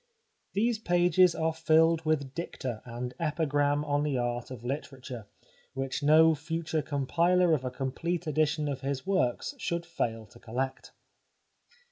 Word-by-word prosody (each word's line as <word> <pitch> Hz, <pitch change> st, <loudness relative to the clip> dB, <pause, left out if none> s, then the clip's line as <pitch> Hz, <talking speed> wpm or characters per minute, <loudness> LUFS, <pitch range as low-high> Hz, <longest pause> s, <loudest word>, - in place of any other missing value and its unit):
These 225 Hz, +3 st, +1 dB
pages 175 Hz, -2 st, +4 dB
are 160 Hz, 0 st, 0 dB
filled 160 Hz, 0 st, +3 dB
with 140 Hz, -4 st, 0 dB
dicta 130 Hz, -9 st, -5 dB
and 125 Hz, +1 st, -5 dB
epigram 145 Hz, -2 st, +1 dB
on 145 Hz, -1 st, +1 dB
the 145 Hz, -3 st, 0 dB
art 120 Hz, 0 st, -2 dB
of 125 Hz, -3 st, -8 dB
literature, 130 Hz, -4 st, -6 dB, 0.5 s
which 135 Hz, +1 st, -3 dB
no 160 Hz, +2 st, +6 dB
future 160 Hz, +1 st, -2 dB
compiler 165 Hz, +5 st, +2 dB
of 140 Hz, -5 st, +1 dB
a 130 Hz, -, -2 dB
complete 145 Hz, +7 st, -3 dB
edition 155 Hz, 0 st, +1 dB
of 135 Hz, -2 st, -3 dB
his 135 Hz, -1 st, -3 dB
works 190 Hz, -, 0 dB
should 170 Hz, -5 st, -2 dB
fail 115 Hz, -10 st, -3 dB
to 120 Hz, +3 st, -18 dB
collect. 130 Hz, +4 st, -4 dB
150 Hz, 140 wpm, -29 LUFS, 130-165 Hz, 0.5 s, no